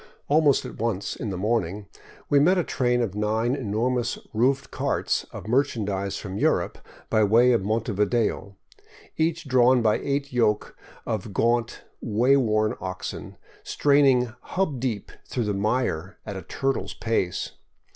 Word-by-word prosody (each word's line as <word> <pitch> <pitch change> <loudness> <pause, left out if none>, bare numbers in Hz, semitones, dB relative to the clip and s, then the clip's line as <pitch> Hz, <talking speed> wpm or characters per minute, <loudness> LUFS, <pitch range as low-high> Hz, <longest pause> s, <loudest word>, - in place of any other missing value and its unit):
Almost 145 -2 +3
at - - -9
once, 110 -4 -2
in 110 - -4
the 95 - -4
morning, 105 -1 -1 0.4
we 145 - +4
met 180 +7 +4
a 180 - +2
train 125 -4 +1
of 105 -5 -3
nine 110 +4 0
enormous 120 0 -1 0.2
roofed 130 +5 +1
carts - - -1
of - - -8
merchandise 105 -6 0
from 100 -1 -6
Europe - - +1 0.3
by 110 - +4
way 115 +5 +5
of 120 - +3
Montevideo, 105 -1 0 0.6
each 160 -1 0
drawn 125 -1 +4
by 110 -1 +3
eight 140 -1 -2
yoke 105 -4 +1 0.3
of 110 -2 -3
gaunt, 120 0 +1 0.2
way 120 +5 +3
worn 110 -5 +2
oxen, 95 -1 -6 0.2
straining 135 -5 +3
hub 180 -9 -2
deep 115 -5 -3 0.2
through 125 - -2
the 105 - 0
mire 100 -4 -1
at 100 - -5
a 95 - -5
turtle's 135 +6 -2
pace. 95 -6 -1
115 Hz, 145 wpm, -25 LUFS, 105-130 Hz, 0.6 s, way